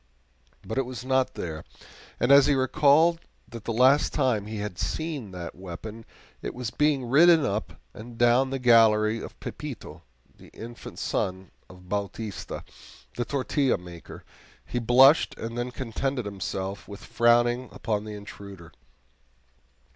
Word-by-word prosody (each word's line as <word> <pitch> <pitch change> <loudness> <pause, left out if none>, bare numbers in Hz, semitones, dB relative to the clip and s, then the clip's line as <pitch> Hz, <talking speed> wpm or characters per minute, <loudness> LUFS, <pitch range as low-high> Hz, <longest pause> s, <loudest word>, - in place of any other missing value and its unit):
But 110 +7 -2
it 135 - 0
was 125 -1 -7
not 130 0 +1
there, 80 -3 -5 0.6
and 125 - +2
as 140 -1 +7
he 145 - +3
recalled 150 +5 +4 0.3
that 115 -2 -10
the - - -2
last 130 +5 +4
time 125 -8 +1
he 110 0 -5
had 105 -4 -5
seen 155 -9 -3
that 90 -2 -7
weapon 100 +5 -9 0.4
it - - -5
was 120 -3 -4
being 150 -3 +1
ridden 160 +3 +6
up 105 0 -3
and 115 +2 -11
down 120 +3 +4
the 135 - -2
gallery 115 -3 +4
by - - -6
Pepito, - - -8 0.3
the - - -16
infant 120 +1 -10
son 95 0 -3 0.2
of 90 0 -15
Bautista, 100 +1 -5 0.5
the 120 - -2
tortilla 140 0 0
maker, 85 -1 -11 0.4
he 120 - -3
blushed 130 +6 +5
and 115 +1 -6
then 120 +1 -2
contented 125 +1 -3
himself 95 0 -5
with 100 0 -10
frowning 120 +1 +2
upon 105 -2 -2
the 105 -1 -7
intruder. 100 -4 -11
120 Hz, 145 wpm, -26 LUFS, 100-130 Hz, 0.6 s, as